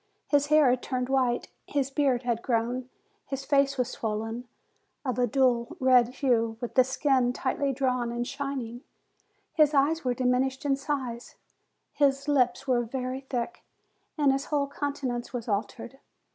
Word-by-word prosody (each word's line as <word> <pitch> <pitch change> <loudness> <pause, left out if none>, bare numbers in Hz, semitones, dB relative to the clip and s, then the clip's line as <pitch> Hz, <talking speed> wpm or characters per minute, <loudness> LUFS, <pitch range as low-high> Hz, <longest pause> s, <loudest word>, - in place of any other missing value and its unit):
His 290 -1 +3
hair 305 -1 +5
had 250 0 0
turned 255 -1 -2
white, 255 -3 +1 0.2
his 275 -2 -1
beard 270 -3 +1
had 235 -2 -1
grown, 245 +2 -1 0.4
his 270 0 -4
face 275 -1 +2
was 250 0 0
swollen, 225 +2 -4 0.6
of 250 -2 -1
a 245 - +3
dull 255 +4 +1
red 255 -3 +5
hue, 235 -3 0
with 240 - -5
the 255 - +6
skin 260 -1 +1
tightly 275 +2 -1
drawn 250 -3 0
and 240 0 -3
shining, 275 -4 -4 0.7
his 305 -2 +4
eyes 300 +4 +2
were 250 -1 0
diminished 260 +3 0
in 275 -1 +3
size, 270 -4 -4 0.6
his 275 -1 +2
lips 255 -3 +2
were 250 -2 +3
very 255 +2 -4
thick, 245 +6 -3 0.5
and 290 -3 +4
his 270 +1 -1
whole 290 -2 0
coun 285 0 -3
tenance 245 -3 -4
was 245 -2 -4
altered. 230 +5 -3
255 Hz, 160 wpm, -28 LUFS, 245-275 Hz, 0.7 s, the